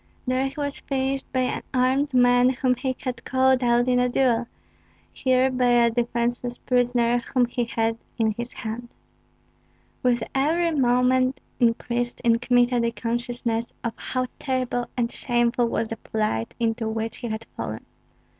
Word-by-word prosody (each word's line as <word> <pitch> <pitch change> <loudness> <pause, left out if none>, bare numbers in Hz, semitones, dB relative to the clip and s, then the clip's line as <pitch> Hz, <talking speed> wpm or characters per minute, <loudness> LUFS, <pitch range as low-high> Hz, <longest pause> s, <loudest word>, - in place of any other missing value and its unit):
There 255 +1 +1
he 270 - -8
was 285 -1 -3
finished 270 0 -2
by 255 - +1
an 255 - -1
armed 260 +3 +2
man 245 0 +5
whom 255 0 +1
he 255 +1 -2
had 250 -2 -4
called 260 0 +2
out 240 0 +3
in 250 -1 +3
a 250 0 +2
duel, 245 -2 +2 0.7
here 260 0 +2
by 250 -1 +1
a 240 -1 +4
defenceless 240 +1 -1
prisoner 245 -1 +2
whom 245 +1 +1
he 240 0 -2
had 225 0 -1 0.2
in 220 -2 +2
his 240 +3 -5
hand. 230 +2 -6 1.1
With 240 -2 +2
every 325 +5 +2
moment 255 -1 +2 0.2
increased 240 +1 0
in 230 -2 +3
Kmita 245 0 +3
the 235 0 +1
consciousness 235 0 -3
of 230 -2 -2
how 255 0 -2
terrible 255 -2 -1
and 235 -1 0
shameful 240 -1 +1
was 225 -1 -1
the 225 - -4
plight 215 - -2
into 225 -1 0
which 225 0 -3
he 240 - -5
had 220 0 -4
fallen. - - -5
245 Hz, 155 wpm, -24 LUFS, 235-255 Hz, 1.1 s, man